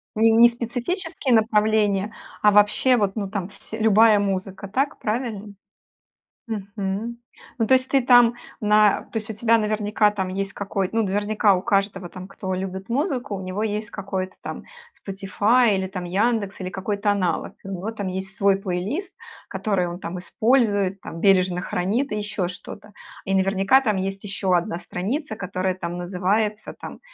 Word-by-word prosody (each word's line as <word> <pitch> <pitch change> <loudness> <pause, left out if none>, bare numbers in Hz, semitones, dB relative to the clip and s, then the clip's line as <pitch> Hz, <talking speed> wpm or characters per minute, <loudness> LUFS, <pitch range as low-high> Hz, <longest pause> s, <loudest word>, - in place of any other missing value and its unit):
Ни 225 +1 +5
не 235 +1 +7
специфические 250 - -2
направления, 215 -2 +2 0.3
а 210 - +6
вообще, 210 +5 +4
вот, 200 -3 0
ну, 200 -3 -3
там 195 -2 -4
сь 205 - -12
любая 220 0 +5
музыка. 195 0 -3
Так 270 +8 -1
правильно? 215 -3 -3 0.9
Мгм. 205 +1 -4 0.4
Ну, 225 - +1
то - - +4
есть 260 0 +3
ты 275 - +3
там 245 -2 +6 0.3
на 210 -1 +4
то - - -2
есть 220 0 -3
у - - -6
тебя 230 +2 +3
наверняка 210 -1 +1
там 190 -3 -2
есть 195 +1 -3
какой 195 -1 -2
ну, 225 - +1
наверняка 205 0 +2
у 180 - -3
каждого 195 -4 0
там, 185 +1 -9
кто 190 -2 -5
любит 190 +2 -5
музыку, 260 - -1
у 190 - -6
него 185 +3 -3
есть 210 0 -2
какой-то 190 -1 -4
там - - -6 0.5
Spotify 205 +4 +2
или, 190 0 -1
там, 185 -1 -6
"Яндекс", 200 +2 0
или 185 - -3
какой-то 200 +2 -2
аналог. 185 -4 -1
У 195 - -8
него 195 +3 -4
там 205 -3 -5
есть 190 +1 -4
свой 200 -3 +3
плейлист, 210 - -3 0.3
который 190 -2 -1
он, 175 +1 -6
там, 180 0 -5
использует, 205 -2 +1
там, 165 - -8
бережно 185 -2 +3
хранит 210 +11 -1
и 210 - -1
еще 205 -3 -2
что-то. 200 +3 -10 0.3
И 195 - -1
наверняка 195 +6 +3
там 215 -6 +1
есть 195 +1 -3
еще 195 -2 0
1 170 0 -1
страница, 220 - -4
которая, 185 -2 -2
там, 175 -1 -5
называется, 200 +4 -1
там, - - -8
205 Hz, 170 wpm, -23 LUFS, 190-220 Hz, 0.9 s, не